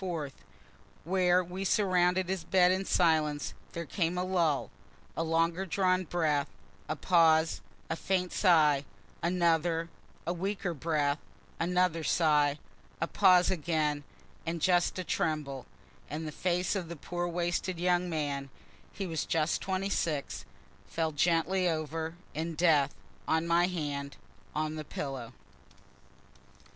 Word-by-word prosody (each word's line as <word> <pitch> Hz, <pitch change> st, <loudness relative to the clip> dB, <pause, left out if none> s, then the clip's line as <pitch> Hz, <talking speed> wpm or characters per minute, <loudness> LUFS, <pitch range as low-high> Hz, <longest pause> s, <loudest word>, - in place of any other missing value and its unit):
4th, 165 Hz, -7 st, -3 dB, 0.7 s
where 180 Hz, +1 st, +3 dB
we 180 Hz, +2 st, -5 dB
surrounded 185 Hz, -2 st, +2 dB
his 190 Hz, -2 st, -2 dB
bed 180 Hz, 0 st, +4 dB
in 190 Hz, +1 st, 0 dB
silence, 155 Hz, -5 st, +2 dB, 0.2 s
there 170 Hz, 0 st, -4 dB
came 170 Hz, +2 st, -1 dB
a 180 Hz, -, 0 dB
lull 170 Hz, -6 st, +1 dB, 0.4 s
a -, -, -1 dB
longer 165 Hz, +2 st, +1 dB
drawn 185 Hz, +1 st, +1 dB
breath, 155 Hz, -4 st, +1 dB, 0.4 s
a 155 Hz, -, 0 dB
pause, 160 Hz, -1 st, +3 dB, 0.3 s
a 160 Hz, -, -2 dB
faint 180 Hz, +1 st, -1 dB
sigh 155 Hz, -7 st, +4 dB, 0.4 s
another 170 Hz, -1 st, +1 dB, 0.4 s
a 170 Hz, -, 0 dB
weaker 190 Hz, 0 st, -2 dB
breath, 150 Hz, -1 st, 0 dB, 0.4 s
another 180 Hz, -1 st, +1 dB
sigh 150 Hz, -3 st, +3 dB, 0.4 s
a 165 Hz, -, +1 dB
pause 180 Hz, 0 st, +5 dB
again 155 Hz, -4 st, 0 dB, 0.4 s
and 165 Hz, +1 st, -3 dB
just 175 Hz, +2 st, +2 dB
a 185 Hz, -, -2 dB
tremble 150 Hz, -6 st, -2 dB, 0.4 s
and 155 Hz, +2 st, -4 dB
the -, -, -4 dB
face 180 Hz, +4 st, 0 dB
of 180 Hz, -4 st, -3 dB
the 170 Hz, -, -5 dB
poor 175 Hz, +3 st, -3 dB
wasted 175 Hz, +1 st, -2 dB
young 180 Hz, 0 st, +2 dB
man 145 Hz, -4 st, -2 dB, 0.4 s
(he 195 Hz, -, -5 dB
was 165 Hz, -3 st, -2 dB
just 160 Hz, -1 st, 0 dB
26,) 185 Hz, -6 st, -2 dB, 0.4 s
fell 160 Hz, -1 st, -1 dB
gently 175 Hz, +4 st, +2 dB
over, 160 Hz, +1 st, -3 dB, 0.2 s
in 165 Hz, +1 st, -3 dB
death, 150 Hz, -4 st, +3 dB, 0.3 s
on 160 Hz, +1 st, +2 dB
my 170 Hz, +1 st, +3 dB
hand, 145 Hz, -5 st, -4 dB, 0.4 s
on 155 Hz, +1 st, -1 dB
the 155 Hz, -, -4 dB
pillow. 135 Hz, -5 st, -5 dB
165 Hz, 130 wpm, -30 LUFS, 155-180 Hz, 0.7 s, pause